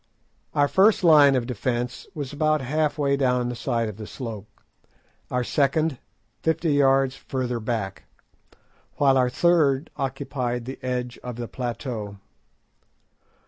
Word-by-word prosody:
Our 145 -1 +4
first 200 +5 +4
line 150 -5 +7
of 125 -2 0
defence 125 +1 -3
was 145 -2 -5
about 155 +1 +2
half 150 +4 0
way 140 -2 +2
down 125 -3 +1
the 125 - -4
side 115 -1 -1
of 105 -2 -7
the 110 -1 -8
slope, 110 -6 -7 0.8
our 125 0 0
second 145 +2 +1 0.4
fifty 160 -1 +1
yards 135 -1 +3
further 125 -3 -3
back, 110 -4 -3 0.9
while 135 -2 +4
our 125 -1 +3
third 155 -1 +2
occupied 130 -3 -3
the 130 +2 -7
edge 125 -1 -3
of 125 -1 -6
the 120 0 -5
plateau. 115 -4 -5
130 Hz, 135 wpm, -24 LUFS, 120-145 Hz, 0.9 s, line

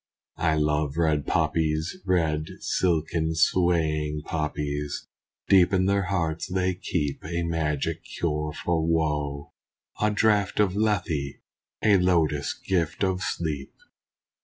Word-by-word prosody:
I 80 -2 +2
love 75 -1 0
red 80 -3 +1
poppies! 80 0 0
Red, 80 -4 +1
silken, 80 -2 0
swaying 80 -4 +1
poppies! 75 -2 -3 0.4
Deep 95 -2 +5
in 95 -1 +2
their 100 0 +2
hearts 85 -4 -1
they 95 0 0
keep 85 -6 -3
A 85 +1 -2
magic 80 -4 -1
cure 75 -2 -2
for 80 +1 -1
woe 75 -3 -1 0.5
a 105 - +4
draught 105 -2 +2
of 100 -3 +3
Lethe 90 -10 0 0.5
A 105 -2 +6
lotus 80 -5 +2
gift 90 -1 -1
of 95 -1 0
sleep. 80 -6 -3
80 Hz, 115 wpm, -26 LUFS, 75-90 Hz, 0.5 s, A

